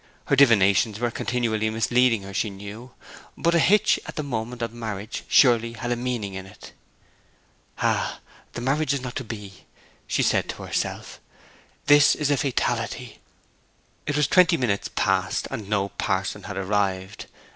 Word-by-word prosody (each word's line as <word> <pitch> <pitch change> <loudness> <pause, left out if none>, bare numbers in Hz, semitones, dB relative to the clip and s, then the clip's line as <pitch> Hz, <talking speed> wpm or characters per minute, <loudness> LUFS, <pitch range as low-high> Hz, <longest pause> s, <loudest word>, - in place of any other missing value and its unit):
Her - - +2
divinations 110 -5 +4
were 120 0 0
continually 120 -3 -1
misleading 115 0 +2
her, 100 0 -9
she 105 - 0
knew: 100 +5 -9 0.5
but 170 - +1
a 170 - +4
hitch 205 +5 +4
at - - -7
the 155 - -2
moment 120 -2 -4
of 115 -1 -4
marriage 110 -2 -5
surely 115 -3 +4
had 120 +2 -4
a - - +2
meaning 120 -5 -3
in 95 0 -7
it. 95 - -13 1.1
'Ah, - - 0 0.3
the - - -5
marriage 140 +2 +1
is 135 - -3
not 125 -1 -6
to 135 - -3
be!' 105 -4 -9 0.4
she - - +1
said - - +1
to - - -6
herself. - - -4 0.7
'This 145 0 +6
is 145 -1 0
a 145 - +3
fatality.' 120 -2 -2 0.9
It 145 - -1
was 150 - +3
twenty 180 0 +4
minutes 110 -6 -1
past, - - 0
and 105 -2 -6
no 100 -2 0
parson 95 0 -2
had 105 -2 -6
arrived. 95 0 -2
115 Hz, 160 wpm, -24 LUFS, 100-130 Hz, 1.1 s, This